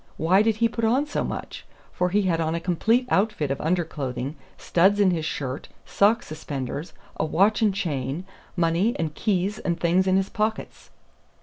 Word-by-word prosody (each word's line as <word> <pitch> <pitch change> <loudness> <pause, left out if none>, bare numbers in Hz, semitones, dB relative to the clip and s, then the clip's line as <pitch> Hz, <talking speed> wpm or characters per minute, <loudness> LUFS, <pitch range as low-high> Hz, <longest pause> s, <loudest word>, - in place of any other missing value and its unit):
Why 180 +5 +4
did 220 0 +2
he 230 +2 +3
put 230 0 -5
on 250 +6 +3
so 300 - -2
much? - - -6 0.3
for 180 - 0
he 205 +3 +2
had 170 -3 +1
on 160 0 0
a - - -1
complete 220 +8 +1
out 210 +3 +3
fit 150 -9 -3
of 135 - -2
underclothing, 145 -5 -2 0.2
studs 190 +4 +3
in 195 -2 +5
his 160 -3 -1
shirt, 135 -3 -4 0.2
sock 215 +4 +3
suspenders, 145 0 -5 0.2
a - - 0
watch 195 +9 +2
and 215 -2 +4
chain, 155 - -3 0.3
money 175 +6 +1
and 160 -2 -2
keys 200 +2 -1
and 170 -1 -2
things 180 +2 +2
in 185 0 +4
his 195 0 0
pockets.' 215 +1 -3
180 Hz, 185 wpm, -25 LUFS, 155-210 Hz, 0.3 s, in